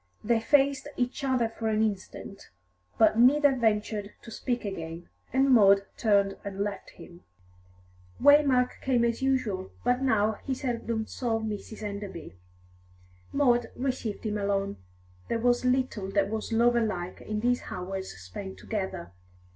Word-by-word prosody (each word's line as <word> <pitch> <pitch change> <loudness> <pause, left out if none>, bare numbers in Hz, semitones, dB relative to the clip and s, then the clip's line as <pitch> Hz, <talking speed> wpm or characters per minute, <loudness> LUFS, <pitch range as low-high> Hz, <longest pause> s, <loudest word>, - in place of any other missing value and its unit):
They 235 -1 +2
faced 275 +3 +2
each 250 +3 -2
other 255 -4 +2
for 225 0 -5
an 220 0 +2
instant, 200 -1 -5 0.5
but 220 - +4
neither 280 +3 +5
ventured 210 -3 0
to 230 - -10
speak 245 0 -3
again, 165 -3 -6 0.2
and 270 +1 +3
Maud 200 -4 +6
turned 200 -3 +2
and 200 -1 -6
left 205 0 -4
him. 175 0 -13 1.0
Waymark 280 -3 +4
came 245 -3 +2
as 235 +1 -1
usual, 235 -9 0
but 245 +1 +2
now 220 -4 +2
he 265 - -2
seldom 230 -4 -2
saw 230 -1 -2
Mrs. 220 0 -6
Enderby. 200 -5 -6 1.0
Maud 245 -4 +3
received 250 -5 -3
him 210 -1 -1
alone. 200 0 -1 0.5
There - - 0
was 245 +1 +2
little 250 -6 0
that 200 0 +1
was 220 +1 -3
lover 235 +1 +3
like 185 -4 -4
in 215 0 -3
these 245 +1 +1
hours 190 +1 -5
spent 95 - -8
together. 190 - -4
220 Hz, 140 wpm, -28 LUFS, 200-250 Hz, 1.0 s, Maud